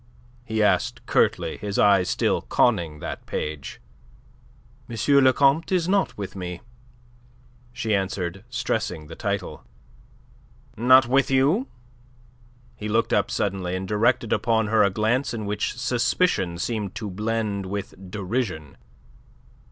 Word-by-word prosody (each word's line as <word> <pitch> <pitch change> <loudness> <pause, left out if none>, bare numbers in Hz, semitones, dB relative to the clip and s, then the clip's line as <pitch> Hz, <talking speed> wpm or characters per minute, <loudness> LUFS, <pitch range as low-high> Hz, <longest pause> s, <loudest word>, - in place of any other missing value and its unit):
he 110 -2 0
asked 105 - +1
curtly, - - +1
his 100 -1 -4
eyes 100 -3 +4
still - - +1
conning 85 -10 +1
that - - -6
page. 75 -3 -5 1.1
"M. 115 - -6 0.3
le 130 - +6
Comte 140 +6 +2
is 175 -3 +1
not 195 +1 +1
with 100 -2 -6
me," 90 -2 -6 1.1
she 110 -3 -2
answered, 95 -1 -2
stressing 115 -10 -2
the - - -10
title. - - -4 1.1
"Not 130 +2 +6
with 135 +2 +2
you?" 145 - +2 1.1
He 105 - -6
looked 115 +2 +1
up - - +2
suddenly, 95 -2 -2
and 95 +1 -4
directed 115 +2 +1
upon 110 -2 +1
her 110 -1 +4
a 100 - +5
glance 120 +5 0
in 110 -2 -4
which 105 +4 -2
suspicion 120 - +1
seemed 105 +1 -3
to 105 -2 -5
blend 105 -1 -2
with 100 +1 -5 0.2
derision. 95 - -3
105 Hz, 130 wpm, -24 LUFS, 95-120 Hz, 1.1 s, le